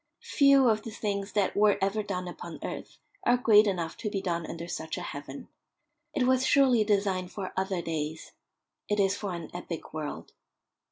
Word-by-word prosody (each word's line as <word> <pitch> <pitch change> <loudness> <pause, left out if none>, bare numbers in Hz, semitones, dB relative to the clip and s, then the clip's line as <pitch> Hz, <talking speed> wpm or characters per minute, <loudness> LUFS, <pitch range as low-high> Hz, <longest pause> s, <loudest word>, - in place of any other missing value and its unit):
Few 275 -2 +6
of 215 -2 +3
the 225 - -7
things 200 -2 -3
that 205 -3 +1
were 205 0 +4
ever 200 +3 0
done 185 -3 -4
upon 175 -1 -7
earth - - -6 0.3
are 245 - +4
great 215 -3 +6
enough 170 -4 -2
to 210 - -3
be 200 - -2
done 170 -3 -2
under 170 0 -6
such 160 -2 -4
a - - -5
heaven. 145 -1 -7 0.7
It 275 - +2
was 260 0 +3
surely 260 -5 +4
designed 195 -3 0
for 190 -3 -5
other 190 -2 -1
days. 160 -1 -4 0.6
It 210 0 +1
is 195 0 +3
for 200 -4 -4
an 170 -2 -7
epic 175 -2 -6
world. 155 -2 -6
195 Hz, 180 wpm, -29 LUFS, 170-215 Hz, 0.7 s, Few